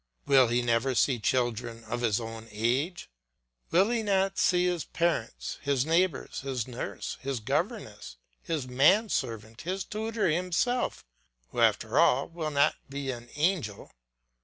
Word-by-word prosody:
Will 130 -3 +6
he 120 +1 +1
never 120 +2 +1
see 125 0 +2
children 120 -1 -1
of 120 +2 -4
his 115 -2 +2
own 115 -1 -7
age? 125 - -1 0.6
Will 190 +6 +4
he 235 -2 +1
not 195 -2 +1
see 180 0 +3
his 175 -3 0
parents, 170 -9 -2
his 140 -2 +1
neighbours, 165 0 +1
his 130 -4 -3
nurse, 125 -1 -5
his 135 -2 -2
governess, 125 - -3 0.2
his 155 -6 -3
man 170 - +4
servant, 115 - -3
his 185 +2 -3
tutor 220 +3 -2
himself, 180 +9 0 0.4
who - - -5
after - - +3
all 135 +2 +4
will 165 -2 -4
not 145 0 +3
be 140 -1 -3
an 120 -1 -9
angel? 150 - -1
135 Hz, 145 wpm, -29 LUFS, 120-180 Hz, 0.6 s, Will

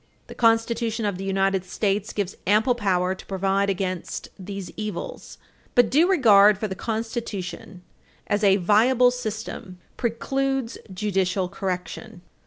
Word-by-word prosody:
The - - -10
Constitution 225 -1 +1
of 200 -3 -2
the - - -4
United 195 -1 +1
States 200 +2 -1
gives 200 -2 -3
ample 220 +5 +4
power 190 -5 0
to 190 - -12
provide 195 +1 0
against 185 -2 -3
these 195 0 -7
evils. 220 - -6 0.4
But 245 -2 +4
due 325 +7 +4
regard 210 - +6
for 215 - -2
the 190 - -4
Constitution 205 -5 -5 0.4
as 205 +1 0
a 195 -1 +6
viable 230 +6 +4
system 215 -6 -6 0.2
precludes 270 +1 -1
judicial 190 -1 0
correction. 185 +2 -5
205 Hz, 130 wpm, -24 LUFS, 190-230 Hz, 0.4 s, regard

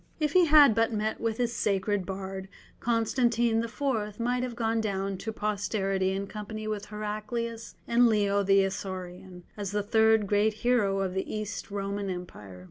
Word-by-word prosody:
If 300 -1 0
he 365 -1 +6
had 295 -5 +7
but 225 +1 +2
met 215 0 -2
with 225 -1 -1
his 240 -1 0
"sacred 200 -3 0
bard," 190 0 -5 0.3
Constantine 235 0 +1
IV. 230 -4 -2
might 245 +1 0
have 250 -2 -4
gone 225 -1 0
down 195 -2 -2
to 220 - -4
posterity 195 -2 -1
in 195 +1 -2
company 215 +1 -6
with 210 -1 -3
Heraclius 215 +2 -5
and 235 +1 +5
Leo 200 -2 +2
the 195 0 +4
Isaurian, 185 -1 -6
as 205 -2 -4
the 205 +1 -1
third 220 0 +4
great 205 +2 +2
hero 205 -6 +2
of 190 -2 -2
the 190 - -3
East 215 0 -4
Roman 200 0 -3
Empire. 105 - -7
210 Hz, 165 wpm, -28 LUFS, 195-230 Hz, 0.3 s, had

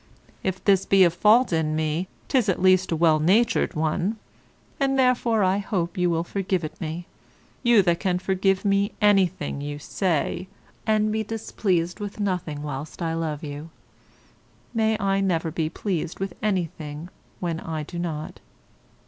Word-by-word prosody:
If 190 0 -3
this 195 -2 +3
be 195 -1 +6
a 175 - +5
fault 210 +6 +4
in 155 -1 +1
me, 155 +3 -1 0.2
'tis 250 -7 +2
at 185 - +1
least 185 0 +4
a - - +2
well 160 -1 +4
natured 220 +9 +2
one; 160 +7 0 0.6
and 270 -1 +1
therefore 245 -4 +3
I 190 +2 +2
hope 185 -5 -2
you 180 -1 +1
will 165 -1 0
forgive 190 -1 -2
it 155 - -7
me, 165 +2 -4 0.6
you 235 -5 +5
that 170 -1 +2
can 185 -2 0
forgive 190 +1 0
me 200 +1 +2
anything, 190 -9 +2
you 145 0 -4
say, 175 +2 -1 0.4
and 215 0 +2
be 220 0 0
displeased 190 -5 -1
with 205 0 -6
nothing 180 -7 -2
whilst 145 0 -6
I 165 -2 -1
love 160 -2 -3
you; 145 +2 -6 1.0
may 220 -1 +2
I 195 -1 +1
never 170 -4 0
be 160 -1 -1
pleased 175 -2 -3
with 195 -2 -3
anything 170 -5 -3 0.3
when 170 -2 -2
I 160 -2 -4
do 170 +3 -7
not. 160 -3 -4
180 Hz, 160 wpm, -24 LUFS, 160-200 Hz, 1.0 s, be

